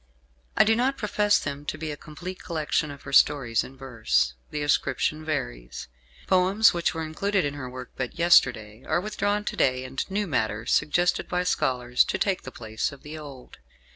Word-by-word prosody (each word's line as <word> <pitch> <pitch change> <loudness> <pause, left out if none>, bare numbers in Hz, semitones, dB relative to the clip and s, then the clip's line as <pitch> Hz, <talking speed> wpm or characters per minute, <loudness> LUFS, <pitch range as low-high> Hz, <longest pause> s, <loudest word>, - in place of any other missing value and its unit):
I - - +8
do 220 +1 +3
not 260 +4 +1
profess 210 -1 +2
them 145 0 -5
to - - -4
be 155 -1 -4
a - - -4
complete 175 +5 -9
collection 155 -2 -1
of 140 -1 -10
her - - -8
stories 125 -5 +4
in 135 - -12
verse. 115 - 0 0.2
The 150 -1 -3
ascription 145 +1 0
varies. - - -4 0.4
Poems 190 +4 +4
which 170 0 0
were 160 - -2
included 190 +4 0
in 145 - -2
her 135 -3 -6
work 125 0 -9
but 125 -2 -4
yesterday 125 -10 +3
are 160 - +2
withdrawn 205 +1 -1
to - - -4
day, 130 -1 +1
and 130 +1 -3
new 205 +2 -1
matter 110 - -1
suggested 175 +4 +1
by 180 0 0
scholars 125 -7 +2
to - - -2
take 195 -2 0
the 130 - -9
place 110 -2 -3
of 140 - -13
the 150 +1 -8
old. 140 -5 -11
150 Hz, 190 wpm, -26 LUFS, 130-180 Hz, 0.4 s, I